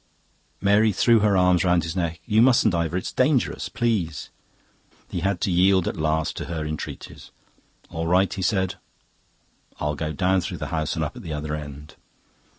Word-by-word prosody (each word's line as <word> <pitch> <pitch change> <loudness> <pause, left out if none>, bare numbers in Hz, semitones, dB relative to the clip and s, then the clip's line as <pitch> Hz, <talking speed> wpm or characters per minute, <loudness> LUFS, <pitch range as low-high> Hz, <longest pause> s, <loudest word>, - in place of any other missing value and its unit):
Mary 105 +2 +3
threw 115 +3 +4
her 105 -2 +3
arms 90 -2 +3
round 90 -2 +2
his 80 +1 -4
neck. 85 -3 -2
"You 110 -1 +3
mustn't, 120 -4 +4
Ivor. 85 0 -1
It's 90 - -4
dangerous. 130 0 +1
Please." 100 - -2 0.8
He - - -2
had 95 +1 -1
to 95 - 0
yield 95 +1 +3
at - - -2
last 80 0 -1
to - - -4
her 80 -2 -4
entreaties. 75 0 -7 0.6
"All 80 0 -3
right," 90 +1 +2
he 95 - -5
said, 95 -1 0 1.0
"I'll 75 0 -1
go 75 +1 -3
down 90 +5 +1
through - - -5
the - - -5
house 80 0 -1
and 80 - -1
up 75 - -6
at 125 - -9
the 85 -7 -6
other 75 0 -4
end." 75 0 -9
90 Hz, 180 wpm, -24 LUFS, 80-100 Hz, 1.0 s, threw